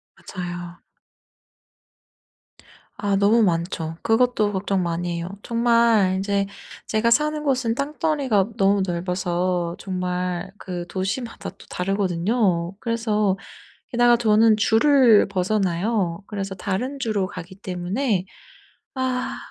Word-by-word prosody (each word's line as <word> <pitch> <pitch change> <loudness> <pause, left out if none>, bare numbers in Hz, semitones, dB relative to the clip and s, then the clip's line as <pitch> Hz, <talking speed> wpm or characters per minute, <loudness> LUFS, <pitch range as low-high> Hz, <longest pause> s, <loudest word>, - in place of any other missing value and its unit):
맞아요. 175 -1 -7 2.2
아 200 -1 0
너무 205 +4 +4
많죠. 170 -3 -1
그것도 225 -2 +2
걱정 190 -1 0
많이 170 0 -2
해요. 170 +1 -4
정말 230 -4 +3
인제 200 0 0 0.4
제가 220 +1 +1
사는 300 +5 +2
곳은 255 -5 +1
땅덩어리가 280 -7 0
너무 195 0 +3
넓어서 175 -1 -1
정말 180 -1 -3
그 180 -3 -6
도시마다 200 +7 -4
또 - - -17
다르거든요. 185 -1 0
그래서 215 -4 0 0.5
게다가 240 0 +4
저는 220 -1 +4
주를 230 0 +5
벗어나요. 190 -1 0
그래서 195 -2 -4
다른 205 +9 -3
주로 215 -7 0
가기 185 +1 -9
때문에 190 +3 -2 0.7
아. 255 -1 -2
200 Hz, 235 characters per minute, -23 LUFS, 180-230 Hz, 2.2 s, 주를